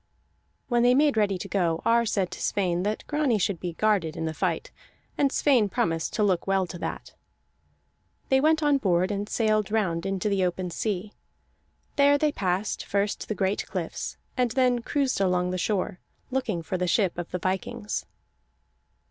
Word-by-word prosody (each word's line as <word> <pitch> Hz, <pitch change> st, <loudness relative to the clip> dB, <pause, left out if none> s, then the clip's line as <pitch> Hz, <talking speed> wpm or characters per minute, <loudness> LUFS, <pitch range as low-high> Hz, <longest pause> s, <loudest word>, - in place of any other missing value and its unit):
When 240 Hz, -1 st, +2 dB
they 245 Hz, +1 st, +5 dB
made 290 Hz, -1 st, +4 dB
ready 205 Hz, -3 st, +2 dB
to -, -, -6 dB
go, 170 Hz, -4 st, 0 dB
Ar 235 Hz, 0 st, +3 dB
said 195 Hz, -4 st, 0 dB
to -, -, -7 dB
Sweyn 180 Hz, -3 st, 0 dB
that 210 Hz, +3 st, -2 dB
Grani 295 Hz, -6 st, +1 dB
should 190 Hz, -2 st, 0 dB
be 175 Hz, -2 st, -4 dB
guarded 190 Hz, -5 st, +1 dB
in 160 Hz, -, -2 dB
the 160 Hz, -, -2 dB
fight, -, -, -2 dB, 0.4 s
and 280 Hz, -2 st, +2 dB
Sweyn 250 Hz, -9 st, +3 dB
promised 165 Hz, -3 st, -1 dB
to 210 Hz, -, +1 dB
look 190 Hz, -3 st, +1 dB
well 195 Hz, -1 st, +2 dB
to 175 Hz, 0 st, -8 dB
that. -, -, -5 dB, 1.2 s
They 265 Hz, 0 st, +4 dB
went 315 Hz, +1 st, +3 dB
on 290 Hz, -2 st, +3 dB
board 185 Hz, -3 st, +2 dB
and 205 Hz, +1 st, -3 dB
sailed 215 Hz, -2 st, +1 dB
round 190 Hz, -5 st, 0 dB
into 195 Hz, +1 st, -1 dB
the 200 Hz, -2 st, +1 dB
open 180 Hz, 0 st, -1 dB
sea; 205 Hz, +1 st, -3 dB, 0.8 s
there 285 Hz, 0 st, +5 dB
they 300 Hz, +1 st, +2 dB
passed 190 Hz, -2 st, -1 dB
first 200 Hz, +1 st, -1 dB
the 215 Hz, -, -2 dB
great 195 Hz, +1 st, -1 dB
cliffs, 180 Hz, -4 st, -4 dB, 0.2 s
and 250 Hz, -1 st, +2 dB
then 250 Hz, 0 st, +2 dB
cruised 270 Hz, -3 st, 0 dB
along 180 Hz, -1 st, +1 dB
the 185 Hz, -, -2 dB
shore, 185 Hz, -2 st, -1 dB, 0.3 s
looking 230 Hz, -10 st, -1 dB
for 185 Hz, +3 st, -3 dB
the 180 Hz, -, 0 dB
ship 190 Hz, -1 st, +2 dB
of 175 Hz, -, -5 dB
the 180 Hz, -, -2 dB
vikings. 180 Hz, -, -3 dB
200 Hz, 180 wpm, -26 LUFS, 180-235 Hz, 1.2 s, they